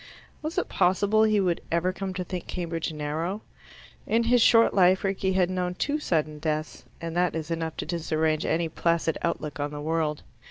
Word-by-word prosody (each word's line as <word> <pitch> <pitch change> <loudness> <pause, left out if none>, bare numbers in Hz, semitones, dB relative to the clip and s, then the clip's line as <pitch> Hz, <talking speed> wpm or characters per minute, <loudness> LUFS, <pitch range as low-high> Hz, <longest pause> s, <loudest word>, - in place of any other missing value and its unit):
Was 310 +3 -5
it 365 - +1
possible 200 +4 +2
he 215 -1 +4
would 180 -3 +1
ever 170 +2 +1
come 195 0 -4
to 180 - -2
think 180 0 -6
Cambridge 165 -2 -3
narrow? 160 +6 -3 0.6
In 230 +1 +2
his 240 +1 +4
short 230 0 +6
life 185 0 +4
Rickie 195 -1 0
had 185 -1 +2
known 180 -1 -2
two 290 +9 -1
sudden 155 - -1
deaths, 155 -4 -3
and 165 0 -5
that 180 -1 +1
is 160 0 -4
enough 165 -1 -3
to - - -3
disarrange 160 -2 0
any 165 +1 0
placid 165 0 0
outlook 150 -1 -3
on 145 +1 -1
the 145 0 -7
world. 155 0 -1
170 Hz, 190 wpm, -26 LUFS, 160-190 Hz, 0.6 s, short